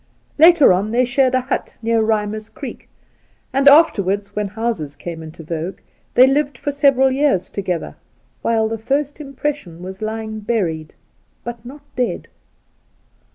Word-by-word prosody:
Later 320 - +7
on 195 +4 0
they 245 +3 +2
shared, 260 +1 +2
a 255 - +2
hut 260 +2 -4
near 230 0 +2
Rimer's 215 0 -1
Creek, - - -9 0.6
and 275 +1 +2
afterwards, 205 - +4
when 210 -1 -1
houses 210 -9 -3
came 165 +2 -7
into 160 +1 -10
vogue, 165 +3 -4 0.4
they 255 - +8
lived 280 -1 +1
for 290 - -3
several 275 -2 +3
years 270 -9 +1
together, 180 -4 -3 0.5
whUe 225 -1 +2
the 225 0 -4
first 280 +6 -2
impression 275 - -5
was 190 +2 -8
lying 220 0 -4
buried, 180 -8 -2 0.5
but 235 -1 -7
not 280 +4 -11
dead. 250 -1 -2
225 Hz, 145 wpm, -19 LUFS, 195-270 Hz, 0.6 s, they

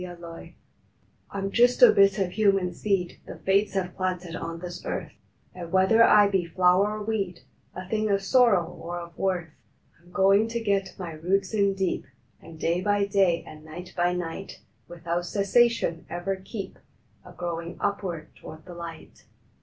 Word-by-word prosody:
A - - -5
RESOLVE 170 -2 -9
I - - -12 0.8
M 195 0 -2
just 245 - +4
a - - +10
bit 195 0 +4
o 195 - +2
human 195 -2 +1
seed 195 -4 -1
The - - -7
Fates 195 +2 +1
have 180 -2 -2
planted 180 -2 -3
on 165 0 -5
this 175 0 -7
earth, - - -4 0.4
And 170 -2 -8
whether 190 +4 +4
I 210 -2 +6
be 195 -2 +1
flower 185 +4 +2
or 210 - -5
weed, 200 -5 -3 0.3
A 185 0 -7
thing 215 +1 0
of 200 -1 +1
sorrow 220 -5 +4
or 175 +1 -7
of 170 -1 -8
worth, 180 -3 -1 0.5
I - - -27
m - - -18
goin 195 +3 +4
to 235 +1 -3
get 200 -3 -1
my 180 -3 -6
roots 185 +6 -1
in 200 -2 +2
deep, 190 -2 -2 0.3
And 160 -1 -13
day 170 +3 0
by 205 +1 +2
day, 195 -4 +2
and 155 0 -12
night 175 +3 -10
by 175 0 +1
night, 180 +2 -6 0.3
Without 170 0 -3
cessation 200 -4 +2
ever 175 +3 -2
keep 190 +1 -8 0.4
A - - -13
growin 170 -1 -5
upward 190 -6 -3
toward 155 0 -12
the 180 - -10
light. 170 -1 -10
185 Hz, 175 wpm, -26 LUFS, 175-200 Hz, 0.8 s, a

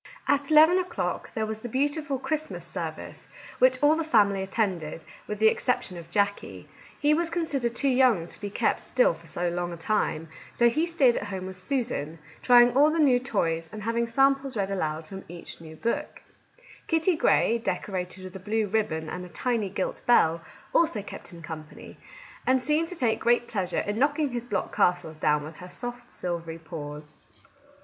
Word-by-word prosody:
At 285 0 +2
eleven 315 +4 +7
o'clock 360 -1 -3
there 220 -2 0
was 215 0 -4
the 240 - -7
beautiful 285 +2 -1
Christmas 310 +3 -3
service, - - -5 0.3
which - - +5
all 300 +2 +6
the 330 - -1
family 205 -9 +3
at 190 - -5
tended, 180 -8 -2 0.2
with 210 - -4
the 220 +1 +5
exception 220 -4 0
of 170 -1 -10
Jackie. 200 +2 -1 0.3
He 295 +1 +3
was 335 +2 +1
considered 290 -8 -1
too 275 - +2
young 250 -9 +4
to 170 - -9
be 205 - -3
kept 200 - 0
still - - +2
for - - -15
so 175 0 -1
long 175 0 -2
a 170 - -6
time; 165 -3 -1 0.2
so 235 0 +4
he 310 +8 0
stayed 275 -8 +3
at - - -3
home 190 -2 -5
with 190 0 -7
Susan, 185 - -2 0.2
trying 245 -1 +6
all 290 +3 +6
the 320 - -1
new 270 -6 +5
toys 165 -9 -1
and 215 -1 -7
having 230 +1 0
samples 270 +1 +2
read 200 -1 -1
aloud 160 -4 -2
from 190 +3 -9
each 170 0 -10
new 160 -1 -10
book. 230 +8 -3 0.6
Kitty 325 +2 +2
Grey, 235 -7 +3
decorated 185 -4 -3
with 185 0 -9
a - - -6
blue 215 +3 0
ribbon 205 -7 -1
and 180 - -5
a 180 - -10
tiny 220 +4 -1
gilt 190 0 -3
bell, 165 -8 +4 0.3
also 315 -12 +2
kept - - -9
him 170 -2 -12
company, 155 -2 -9 0.5
and 260 0 +4
seemed 300 +5 +1
to 360 - -6
take 240 -8 +1
great 240 0 +2
pleasure 190 -6 -1
in 205 +2 -3
knocking 290 +2 +2
his 240 -1 -4
block 205 -6 -3
castles 175 -3 +1
down 150 -1 +2
with 155 +1 -9
her 180 - -10
soft 245 +7 -6
silvery 170 -2 -4
paws. 150 -2 -8
220 Hz, 190 wpm, -27 LUFS, 175-270 Hz, 0.6 s, eleven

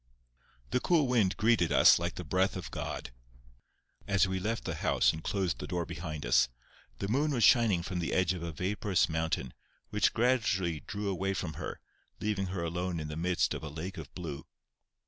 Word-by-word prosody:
The - - +2
cool 160 +2 +3
wind 110 -7 +2
greeted 110 -7 +3
us - - +7
like 85 0 -3
the 90 - -5
breath 95 +5 +1
of 90 -2 -6
God, - - -5 1.0
as 100 -1 +3
we 95 0 -2
left 110 +5 -2
the - - -3
house - - +2
and 80 0 -7
closed 90 -10 -1
the - - -5
door 90 -1 -2
behind 75 -5 -6
us. - - +4 0.5
The 100 - -3
moon 140 +8 +1
was 125 -6 +1
shining 115 -9 +5
from 90 0 -3
the 85 - -2
edge 95 -1 +2
of 90 - -6
a 85 0 -4
vaporous 95 +3 0
mountain, 80 -5 -2 0.4
which - - +3
gradually 105 -9 +1
drew 100 +7 -5
away 95 0 -1
from 90 -3 -3
her, - - -6 0.4
leaving 100 -2 -1
her 90 -2 -3
alone 85 +1 -2
in 75 -1 -5
the 75 - -5
midst 90 +2 +1
of - - -5
a 80 - -5
lake 85 +6 -6
of - - -9
blue. 80 -6 -6
90 Hz, 195 wpm, -31 LUFS, 85-105 Hz, 1.0 s, us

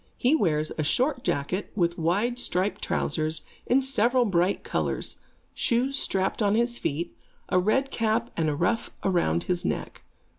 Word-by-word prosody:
He 250 +4 +3
wears 155 - +1
a - - +2
short 255 - +1
jacket, 145 +8 -1
with 170 -3 0
wide 205 +10 +1
striped 190 -3 0
trousers, 155 0 -1 0.2
in 265 +2 +3
several 250 -1 +2
bright 185 -1 +1
colors, - - -2 0.4
shoes 250 +4 +1
strapped 190 -5 0
on 205 0 +3
his 240 +1 +2
feet, 155 +4 -3 0.3
a 185 - +3
red 265 +9 +1
cap 230 +1 0
and 160 -2 +1
a 145 - -1
ruff 180 +9 0
around 170 - +1
his 180 -1 -1
neck. - - -3
200 Hz, 155 wpm, -26 LUFS, 170-240 Hz, 0.4 s, He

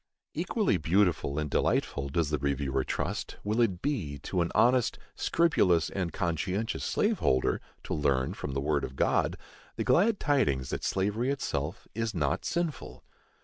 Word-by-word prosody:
Equally - - +1
beautiful 85 -4 +1
and 75 -1 -1
delightful, 70 -1 0
does 75 +1 0
the 75 - 0
reviewer 70 -1 0
trust, - - -3
will 110 +3 +1
it 95 -7 +1
be, 100 - -2
to 90 - -1
an 85 - -1
honest, 125 0 +3 0.2
scrupulous 95 - +2
and 90 -4 -2
conscientious 90 +8 -2
slave 215 0 +1
holder, 65 0 +2 0.2
to - - -4
learn, 70 -4 +1
from 70 - -5
the 70 - 0
word 70 0 0
of 65 - -5
God, - - +1 0.4
the - - -1
glad 205 +4 +3
tidings 105 - +1
that - - -3
slavery 105 +6 0
itself 85 - -3
is 115 -2 -2
not 75 -2 0
sinful. 170 -6 -3
85 Hz, 155 wpm, -29 LUFS, 70-115 Hz, 0.4 s, honest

